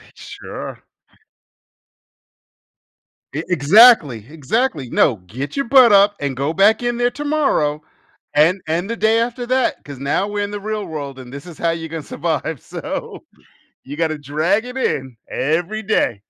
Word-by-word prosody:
Sure. - - -9 2.5
E 155 - -3
exactly. 170 - +5
Exactly, 155 - -2
"No, 130 - +3
get 130 +9 -6
your 275 - 0
butt 250 -1 +6
up 200 +1 +5
and 140 -3 -3
go 140 +4 -1
back 205 +6 +4
in 240 0 -1
there 245 0 +2
tomorrow, 280 - 0 0.5
and 165 +6 +4
and 170 +5 -1
the 230 - -3
day 220 +2 +3
after 245 +1 -3
that, 255 0 0
'cause 140 -3 -9
now 140 +8 0
we're 205 0 -2
in 205 - -4
the 205 - -4
real 210 0 -4
world, 145 -5 -6
and 125 -1 -11
this 140 +3 -9
is 170 -4 -11
how 170 - 0
you're 165 -1 -5
gonna 160 -1 -6
survive, 160 -2 -3
so - - -6 0.6
you 145 +3 -8
gotta 160 -2 0
drag 155 - 0
it 250 +1 -7
in, 130 - -2
every 175 +9 -1
day." 115 - 0
170 Hz, 160 wpm, -19 LUFS, 145-220 Hz, 2.5 s, butt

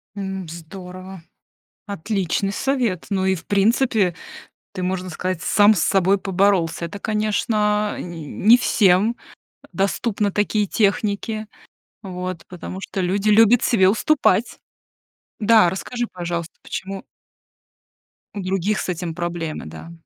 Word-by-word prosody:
М, 190 -2 -5
здорово, 180 +2 -9 0.6
отличный 195 -1 -2
совет. 250 - -1
Ну 190 -1 0
и, 190 0 +2
в 160 - -10
принципе, 205 -2 +2 0.6
ты, 185 -2 -4
можно 185 0 -2
сказать, 180 +1 -3
сам 205 +1 +5
с 200 - -1
собой 195 0 +3
поборолся. 190 -4 +1
Это, 200 +5 -7
конечно, 210 0 0
не 170 -3 -7
не 225 - +5
всем, 205 -1 +3 0.5
э, - - -17
доступны 200 +1 0
такие 210 +1 0
техники. 215 0 0 0.6
Вот, 180 -2 -5
потому 185 +1 -7
что 195 - -5
люди 195 +4 0
любят 225 +2 +6
себе 190 -6 +4
уступать. 230 -1 +2 0.8
Да, 215 -3 +5
расскажи, 240 +6 -3
пожалуйста, 170 -2 -4
почему 195 0 -6 1.3
у 200 - -3
других 195 +3 -1
с - - -4
этим 170 -1 -3
проблемы, 170 -2 -4
да? 80 - -10
195 Hz, 125 wpm, -21 LUFS, 180-210 Hz, 1.3 s, любят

